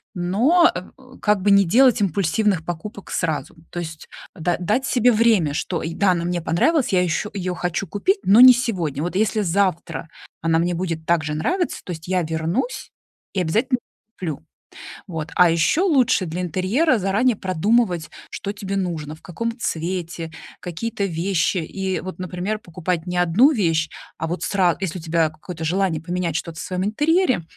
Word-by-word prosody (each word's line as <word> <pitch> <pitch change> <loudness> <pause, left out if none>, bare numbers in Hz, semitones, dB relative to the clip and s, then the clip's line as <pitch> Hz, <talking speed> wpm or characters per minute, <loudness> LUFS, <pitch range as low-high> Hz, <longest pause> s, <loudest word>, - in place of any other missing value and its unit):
но, 235 - +3
м, 255 +8 -10
как 210 -2 +2
бы, 205 - +4
не 200 0 +6
делать 245 +6 +4
импульсивных 195 0 +1
покупок 175 +4 -7
сразу. 160 -3 -2
То 175 - -5
есть 160 -2 -7 0.3
да 170 +1 -1
дать 215 +9 0
себе 245 0 +4
время, 215 -9 +3
что, 170 +3 -2
да, 185 +4 +1
она 170 -1 -1
мне 175 0 -1
понравилась, 265 - +1
я 180 -2 +3
еще, 180 +4 -1
я - - -2
её 180 0 -2
хочу 180 +2 -2
купить, 370 - +1
но 210 +5 +6
не 255 0 +11
сегодня. 175 - -2
Вот, 175 +2 -3
если 215 +2 +1
завтра 175 -3 -1 0.3
она 165 0 +2
мне 175 +2 +1
будет 165 -2 -3
так 170 -2 +2
же 150 +1 -3
нравиться, 350 - -1
то - - -7
есть 160 -1 -7
я 180 -1 +1
вернусь 160 - -2 0.4
и 190 - 0
обязательно 235 +10 +1 0.4
куплю. 160 - -4 0.6
Вот, 160 -3 -5
а 180 -1 +6
ещё 170 - +2
лучше 255 - +3
для 175 +3 -4
интерьера 195 - +1
заранее 210 +6 +2
продумывать, 185 -1 +1 0.2
что 200 - -4
тебе 200 -1 -5
нужно, 165 -5 -3
в - - -21
каком 230 +6 -4
цвете, 170 -3 -3 0.3
какие-то 200 +4 -3
вещи. 180 +1 0
И 190 +3 -3
вот, 185 0 -7
например, 185 +4 -3
покупать 175 -2 -3
не 180 0 -2
1 180 - +5
вещь, 165 - +1 0.3
а 160 - -2
вот 175 +2 -3
сра 185 -5 +2
если 185 -2 -3
у - - -10
тебя 160 -1 +1
какое-то 160 +1 -8
желание 175 -1 0
поменять 175 -1 -2
что-то 165 -1 -4
в - - -4
своем 185 +2 -2
интерьере, 295 - +2
180 Hz, 175 wpm, -22 LUFS, 165-210 Hz, 0.6 s, не